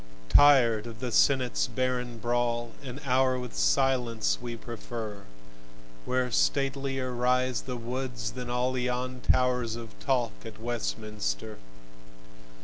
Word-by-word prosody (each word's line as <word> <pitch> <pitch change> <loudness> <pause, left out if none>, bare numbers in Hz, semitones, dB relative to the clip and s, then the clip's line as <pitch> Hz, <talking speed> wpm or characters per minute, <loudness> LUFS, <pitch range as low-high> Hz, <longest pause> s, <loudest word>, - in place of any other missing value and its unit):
Tired 120 - +6
of 115 -1 -9
the 125 0 -3
Senate's 130 +1 +3
barren 125 -2 -2
brawl, 120 0 0
An 135 -1 -7
hour 130 0 +3
with 125 -1 -6
silence 115 - +2
we 120 -1 -5
prefer, 110 -3 -7 0.8
Where 125 -1 0
statelier 135 -1 0
rise 125 0 +1
the 125 -2 -5
woods 125 -1 -4
than 125 0 -6
all 125 +1 0
Yon 125 0 -2
towers 125 -3 +2
of 115 -2 -8
talk 125 -4 +1
at 110 -2 -9
Westminster. 110 -2 -3
125 Hz, 120 wpm, -28 LUFS, 115-130 Hz, 0.8 s, Tired